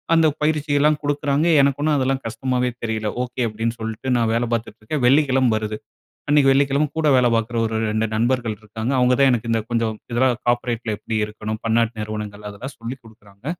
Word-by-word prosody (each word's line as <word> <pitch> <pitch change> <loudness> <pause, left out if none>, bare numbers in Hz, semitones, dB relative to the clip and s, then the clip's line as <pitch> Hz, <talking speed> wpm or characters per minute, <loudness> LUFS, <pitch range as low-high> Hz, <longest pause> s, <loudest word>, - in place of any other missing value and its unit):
அந்த 165 -1 +5 0.2
பயிற்சியெல்லாம் 150 -1 +2
குடுக்குறாங்க, 145 +2 0 0.2
எனக்கு 140 0 +1
ஒண்ணும் 150 -2 +2
அதெல்லாம் 135 0 0
கஷ்டமாவே 125 +2 -1
தெரியல. 110 -1 -2 0.2
"ஓகே" 125 +1 -5
அப்படீன்னு 115 +2 -3
சொல்ட்டு 110 +3 -2
நான் 115 -1 +1
வேலை 120 +1 0
பாத்துட்டுருக்கேன், 115 +4 -3
வெள்ளிக்கிழம 135 -3 +3
வருது. 105 0 -4 0.5
அன்னைக்கு 145 -2 +5
வெள்ளிக்கிழம, 140 +2 +2
கூட 155 -1 +2
வேலை 125 -1 +4
பாக்குற 115 +1 -1
ஒரு 110 0 -3 0.2
2 110 +1 0
நண்பர்கள் 115 -1 0
இருக்காங்க. 110 +3 -4
அவங்க 125 0 +4
தான் 135 - +6
எனக்கு 115 -1 -1
இந்த 115 -1 +1
கொஞ்சம் 115 -2 0 0.2
இதெல்லாம், 125 +1 +2
"கார்ப்பரேட்ல 120 -2 0
எப்படி 110 - -5
இருக்கணும்? 110 0 -6
பன்னாட்டு 115 +1 +2
நிறுவனங்கள்" 105 -1 -6
அதெல்லாம் 125 +7 -8
சொல்லிக் 120 +3 -6
குடுக்குறாங்க. 105 0 -19
120 Hz, 170 wpm, -21 LUFS, 110-135 Hz, 0.5 s, தான்